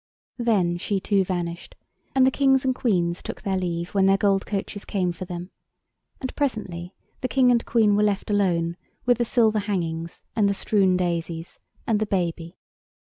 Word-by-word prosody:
Then 195 -8 +2
she 195 +3 -1
too 195 0 +2
vanished; 175 -2 -4 0.4
and 260 -1 +6
the 260 - +4
Kings 270 -1 +3
and 260 - +3
Queens 180 -8 0
took - - -7
their 195 -1 0
leave 175 -2 -2
when 195 -1 +4
their 195 0 +5
gold 195 -1 +1
coaches 200 0 -4
came 185 -3 -1
for 175 +2 -7
them. 175 0 -7 0.7
And 260 - -5
presently 195 - -3 0.2
the 255 - -1
King 255 -1 +4
and 235 -1 +3
Queen 215 -3 +3
were 210 - +3
left 205 0 0
alone 170 -4 +1 0.3
with 245 -1 +3
the 240 - +2
silver 220 -3 +3
hangings 170 -5 -3
and 205 -3 +3
the 200 - 0
strewn 190 -3 +2
daisies 170 -2 -3 0.3
and 220 -2 +1
the 215 - -1
baby. 170 -3 -2
195 Hz, 175 wpm, -24 LUFS, 175-220 Hz, 0.7 s, and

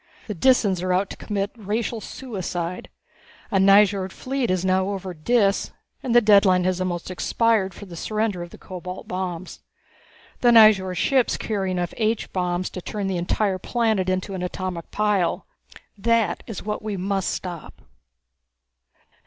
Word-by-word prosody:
The 210 - -4
Disans 200 -3 +3
are 185 0 -1
out 185 +2 +1
to - - -6
commit 200 -1 -3
racial 220 +1 -3
suicide. 180 -9 -5 0.6
A 195 - +3
Nyjord 195 -1 +5
fleet 260 +1 -2
is 185 0 0
now 190 +1 +2
over 190 -2 -4
Dis 200 +4 +1 0.3
and 240 -2 -1
the 240 - +8
deadline 200 -4 +5
has 185 0 0
almost 180 -1 -3
expired 200 0 +1
for 205 - -9
the 180 -3 -10
surrender 215 0 -2
of 175 - -7
the - - -13
cobalt 180 0 -8
bombs. 185 -1 -5 0.8
The 245 - +4
Nyjord 210 -5 +6
ships 260 +6 +2
carry 200 -4 -2
enough 180 -2 -2
H 220 0 -1
bombs 180 0 -1
to 185 - -6
turn 205 +2 -4
the 190 -2 -1
entire 185 +2 0
planet 220 -4 0
into 185 +1 -2
an 185 - -4
atomic 180 -1 -4
pile. 205 -4 0 0.5
That 225 -3 +1
is 225 - -6
what 210 0 -3
we 215 -2 -4
must 195 0 -1
stop." 175 -4 -6
195 Hz, 155 wpm, -23 LUFS, 185-215 Hz, 0.8 s, the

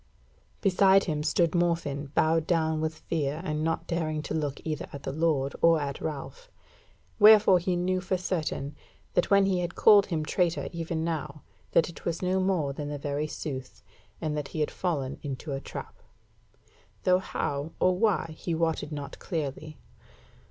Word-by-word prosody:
Beside 195 0 +5
him 150 -4 -2
stood 160 +2 +2
Morfinn 165 -5 0
bowed 160 0 +2
down 160 -2 +1
with 160 0 -2
fear 150 -2 -2
and 155 -3 -2
not 165 0 -1
daring 155 -3 -2
to - - -4
look 145 -3 -2
either 155 -2 -3
at 140 - -8
the - - -3
Lord 145 -3 +1
or 165 -1 +5
at 140 -2 -4
Ralph. 160 - -6 0.7
Wherefore 210 -3 +8
he 180 +1 -1
knew 185 +1 0
for 185 0 -1
certain 155 -5 -3 0.4
that 175 - +2
when 200 -1 +5
he 190 -2 +1
had 175 0 -3
called 205 -2 +6
him 160 -4 -2
traitor 175 +1 0
even 165 -1 -3
now, 155 -3 -4 0.3
that 165 - +4
it 170 - -11
was 170 +1 -2
no 185 +1 +1
more 180 -7 +1
than 145 +1 -5
the 145 - -3
very 145 +1 -2
sooth, 130 -4 -6 0.4
and 155 -2 -2
that 150 -2 -3
he 155 - -4
had 150 - 0
fallen 145 -7 -2
into 140 +1 -5
the 135 - -2
trap; - - -7 1.1
though 185 0 +4
how 145 -4 -3
or 185 0 +3
why 195 -5 +1
he 170 +1 -3
wotted 160 -2 -1
not 145 -1 -6
clearly. 155 -1 -4
160 Hz, 175 wpm, -28 LUFS, 150-180 Hz, 1.1 s, Wherefore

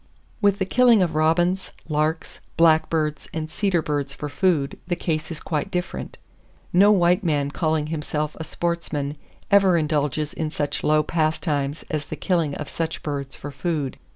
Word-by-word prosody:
With 200 -1 +4
the 190 - 0
killing 235 -1 +5
of 170 -3 -1
robins, 175 +4 +2 0.2
larks, 155 +1 -1 0.2
blackbirds 160 -2 +2
and 155 -1 -3
cedar 185 -5 +1
birds 145 -2 -2
for 150 +1 -5
food, 145 -1 +1
the 175 - 0
case 160 -2 -2
is 165 -3 -5
quite 150 -3 -2
different. 180 0 -4 0.6
No 200 +4 +6
white 180 0 +3
man 145 -4 0
calling 155 -1 0
himself 150 0 -2
a - - -3
sportsman 155 -3 -2 0.4
ever 195 -3 +5
indulges 150 -1 0
in 160 -1 -2
such 145 -1 -3
low 155 0 +3
pastimes 155 -2 -1
as 150 -2 -2
the - - -5
killing 165 -7 0
of 150 - -5
such 165 -1 -4
birds 140 -3 -3
for 145 - -7
food. 140 -1 -3
155 Hz, 160 wpm, -23 LUFS, 150-175 Hz, 0.6 s, No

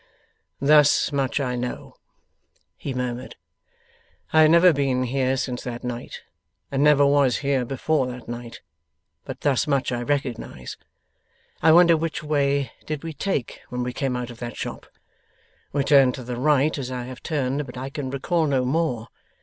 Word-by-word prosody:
'Thus 145 0 +4
much 140 -1 0
I 125 -3 -1
know,' 125 0 -5 0.8
he 140 - -6
murmured. 125 0 -4 1.0
'I 155 - +6
have 155 - +7
never 170 +2 +6
been 135 -3 0
here 130 +1 0
since 125 -1 -3
that 120 -1 -6
night, 125 -1 -6 0.5
and 140 0 +1
never 150 -1 +5
was 140 -3 +3
here 135 -3 +1
before 135 +2 0
that 125 -1 -8
night, 120 0 -7 0.6
but - - -7
thus 140 -2 +1
much 140 -3 +1
I 120 -1 -2
recognize. 135 -2 -3 0.9
I 160 - +6
wonder 170 0 +7
which 160 -1 -3
way 140 -4 0 0.2
did 155 -1 -4
we 165 -1 -5
take 145 -4 -3
when 125 0 -3
we 125 0 -3
came 135 -1 -2
out 125 0 -4
of 120 - -13
that 120 -1 -6
shop. - - -6 0.8
We 140 -1 0
turned 135 -3 +5
to 130 - -8
the 125 0 -5
right 145 +3 +2
as 130 -2 -4
I 125 -1 -4
have 130 +1 -9
turned, 140 -2 -2
but 125 - -9
I 135 +2 -5
can 140 -2 -4
recall 155 +5 0
no 130 -3 +1
more. 130 -5 -1
135 Hz, 170 wpm, -24 LUFS, 125-145 Hz, 1.0 s, have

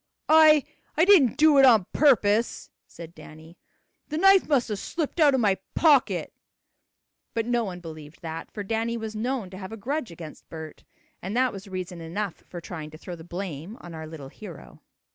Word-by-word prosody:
"I 310 -2 +7 0.3
I 325 - +5
didn't 355 - +5
do 305 -2 +5
it 270 - +8
on 220 -7 +5
purpose," 230 -6 +2 0.2
said 170 -1 -11
Danny. 160 +2 -14 0.5
"The 305 - -4
knife 390 +2 +5
must 265 -6 +2
have 210 -2 -3
slipped 325 - -4
out 290 -4 +5
of - - +1
my 200 -4 +2 0.2
pocket." 295 -5 +3 1.0
But 230 -1 0
no 240 0 0
one 180 -3 -7
believed 155 -1 -11
that, 165 0 -6
for 205 - -6
Danny 225 +3 -2
was 220 -1 -6
known 230 -3 -3
to 185 - -9
have 190 0 -8
a 225 - -7
grudge 270 +5 -3
against 165 -2 -11
Bert, 160 -1 -10 0.4
and 195 +6 -4
that 255 -1 +2
was 195 +1 -9
reason 185 -2 -6
enough 175 +3 -4 0.2
for 175 - -7
trying 160 -2 -8
to 155 - -12
throw 175 +2 -8
the 165 - -12
blame 175 - -7
on 175 - -11
our 160 -1 -7
little 155 -4 -9
hero. 180 -1 -12
205 Hz, 190 wpm, -25 LUFS, 170-255 Hz, 1.0 s, it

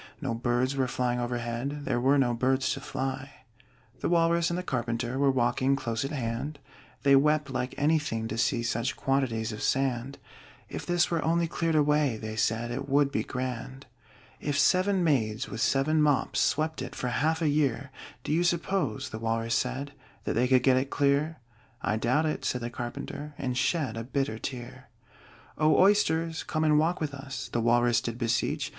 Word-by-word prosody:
No 135 -6 -2
birds 120 +3 0
were 130 -2 +1
flying 125 0 -1
overhead 120 +4 -3
There 120 - 0
were 135 +3 +4
no 125 -3 +2
birds 130 +2 +1
to 135 - -6
fly. 135 0 -5 0.5
The - - -1
Walrus 170 0 +3
and 170 - -2
the 180 - -3
Carpenter 120 -2 -2
Were 140 -1 +4
walking 130 +1 +2
close 115 -4 -2
at 135 - -3
hand; 130 +2 -3 0.5
They 140 0 +6
wept 150 0 +3
like 130 -1 -3
anything 145 -7 +1
to 110 - -3
see 115 +1 +1
Such 115 +2 -1
quantities 125 -5 0
of 105 - -7
sand: 135 0 0 0.5
"If - - -6
this 175 0 +2
were 165 -2 0
only 170 +1 +2
cleared 165 -1 -1
away," 150 -4 +3
They 110 0 -6
said, 115 +1 0
"it 135 +3 -4
would 140 0 +3
be - - 0
grand!" 130 +1 -5 0.5
"If 145 -1 -2
seven 185 +7 +3
maids 110 -9 0
with 110 - -5
seven 155 +3 +2
mops 145 -3 +2
Swept 155 0 0
it 130 - -6
for 125 - -2
half 155 +7 +1
a 165 - +1
year, 140 -2 0 0.3
Do - - -3
you 170 +2 +2
suppose," 175 - -1
the 110 - -5
Walrus 115 0 -1
said, 140 +2 -1 0.3
"That - - -1
they 125 +3 +2
could 130 -1 +4
get 130 -1 +5
it 135 +1 -1
clear?" 145 +3 +1 0.5
"I 105 - +1
doubt 125 +8 +1
it," 155 - -2
said 125 - -1
the 120 0 -4
Carpenter, 130 +4 -6
And 125 -2 -2
shed 135 -3 0
a 115 - -3
bitter 130 -3 -2
tear. 120 -2 -7 0.7
"O 155 0 +4
Oysters, 165 -5 +3
come 155 - -2
and 150 -1 +4
walk 165 +3 +1
with 150 -2 -3
us!" 135 -1 -6
The 120 - +1
Walrus 120 0 +3
did 115 0 -4
beseech. 125 +5 0
135 Hz, 185 wpm, -28 LUFS, 120-150 Hz, 0.7 s, They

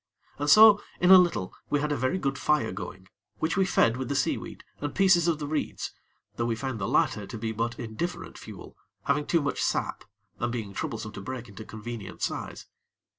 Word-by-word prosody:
And 145 +1 0
so 215 +2 +9 0.2
in 180 +1 +5
a 190 - +12
little, 170 - +1 0.2
we 145 - +2
had 150 +1 -1
a - - +1
very 130 +9 0
good 140 -6 -1
fire 150 -7 +1
going, 95 0 -8 0.3
which 160 +1 -1
we 190 0 +3
fed 115 -10 +3
with 130 0 -4
the 140 - -1
seaweed - - -2 0.2
and 145 -1 -4
pieces 185 -3 +5
of 165 -2 +2
the 150 - -5
reeds, 150 +1 -3 0.5
though 115 - 0
we 115 - 0
found 130 0 -4
the 95 - -2
latter 105 -2 +1
to 115 - -7
be 110 0 -3
but 115 +2 -2
indifferent 120 +10 -5
fuel, - - -11 0.3
having 145 +1 0
too 170 -3 +2
much 140 - -1
sap, - - -1 0.4
and 120 0 -1
being 110 -5 -4
troublesome 110 +2 -4
to 100 - -8
break 125 +3 -6
into 105 +2 -10
convenient 110 -2 -7
size. - - -4
130 Hz, 205 wpm, -27 LUFS, 110-155 Hz, 0.5 s, a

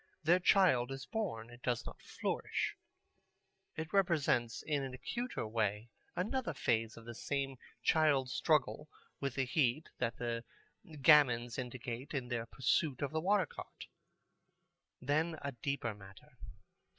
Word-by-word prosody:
Their 175 +4 +5
child 175 -10 +4
is 135 0 -5
born. 120 - -3
It 120 +1 -13
does 120 -2 -1
not - - -9
flourish. - - -2 1.0
It 160 0 -5
represents 150 - +2
in 145 -2 0
an 130 -1 -4
acuter 240 - -3
way 110 0 -1 0.2
another 220 - -1
phase 115 -4 0
of 115 - -11
the 120 - -6
same 135 +2 -2 0.3
child 145 -5 +3
struggle 150 -1 +1 0.3
with 140 -3 -2
the 135 - +1
heat 130 +3 +1
that 120 -2 -1
the 115 -1 -2 0.6
gamins 125 -6 +6
indicate 125 +2 -5
in 125 -3 -2
their 115 -2 -2
pursuit 135 +2 +1
of 140 - -1
the 160 0 -1
water 195 +1 +3
cart. - - -10 1.1
Then 155 +5 0
a 140 - -2
deeper 125 -2 -2
matter. 95 -1 -15
135 Hz, 140 wpm, -35 LUFS, 120-155 Hz, 1.1 s, gamins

